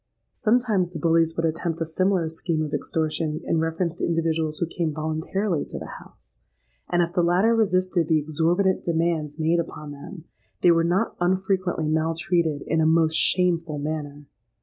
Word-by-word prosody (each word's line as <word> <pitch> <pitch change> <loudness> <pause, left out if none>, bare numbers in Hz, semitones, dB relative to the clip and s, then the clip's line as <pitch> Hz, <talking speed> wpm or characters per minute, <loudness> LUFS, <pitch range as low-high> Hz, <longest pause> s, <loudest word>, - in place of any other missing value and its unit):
"Sometimes, 220 -5 +1
the 175 - -7
bullies 165 +1 +2
would 165 - +1
attempt 165 +1 -2
a 165 - -1
similar 185 +1 +1
scheme 160 0 -2
of 150 - -5
extortion 155 +1 -1
in 165 - 0
reference 165 +1 -1
to - - -5
individuals 160 -2 0
who 170 - 0
came 170 -1 -2
voluntarily 160 +4 -2
to - - -8
the - - -8
house; - - -19 0.5
and 175 0 +3
if 170 0 -4
the 180 - +2
latter 180 +7 +3
resisted 185 -6 +1
the 160 - +3
exorbitant 165 +5 +1
demands 165 -3 -1
made 165 +2 +1
upon 150 -3 -5
them, 145 +4 -10 0.4
they 175 - +6
were 165 0 +3
not 175 +3 0
unfrequently 185 -2 0
maltreated 160 0 0
in 160 +1 +1
a - - +3
most 160 0 +3
shameful 170 -3 +2
manner. 145 -1 -5
165 Hz, 170 wpm, -24 LUFS, 155-175 Hz, 0.5 s, they